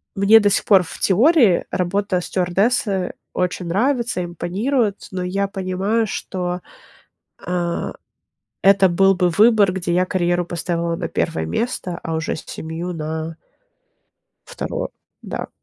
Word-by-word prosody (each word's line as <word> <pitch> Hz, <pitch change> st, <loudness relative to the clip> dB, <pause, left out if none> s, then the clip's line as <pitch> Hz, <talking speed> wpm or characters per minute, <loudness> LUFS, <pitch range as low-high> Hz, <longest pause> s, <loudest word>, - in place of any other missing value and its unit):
мне 200 Hz, +3 st, +6 dB
до 205 Hz, -1 st, +3 dB
сих 200 Hz, -, +1 dB
пор, 195 Hz, -3 st, +6 dB
в -, -, -10 dB
теории, 230 Hz, -, +4 dB
работа 185 Hz, 0 st, 0 dB
стюардессы 190 Hz, +2 st, 0 dB, 0.2 s
очень 180 Hz, -1 st, -2 dB
нравится, 235 Hz, 0 st, 0 dB
импонирует, 205 Hz, +6 st, -1 dB
но 185 Hz, -1 st, -3 dB
я 195 Hz, +2 st, -1 dB
понимаю, 195 Hz, +4 st, -1 dB
что, 180 Hz, -2 st, -4 dB, 0.8 s
а, 175 Hz, -1 st, -2 dB, 0.7 s
это 195 Hz, 0 st, +6 dB
был 195 Hz, +2 st, +4 dB
бы 180 Hz, -1 st, +2 dB
выбор, 210 Hz, 0 st, +5 dB
где 180 Hz, -2 st, -2 dB
я 180 Hz, +1 st, +2 dB
карьеру 175 Hz, -1 st, 0 dB
поставила 170 Hz, 0 st, -2 dB
на -, -, -4 dB
1 80 Hz, 0 st, -1 dB
место, 180 Hz, -, -3 dB
а 165 Hz, -, -3 dB
уже 160 Hz, 0 st, -2 dB
семью 160 Hz, +3 st, -6 dB
на 160 Hz, 0 st, -4 dB, 1.1 s
2, -, -, -4 dB, 0.3 s
да. -, -, -5 dB
185 Hz, 125 wpm, -20 LUFS, 175-205 Hz, 1.1 s, мне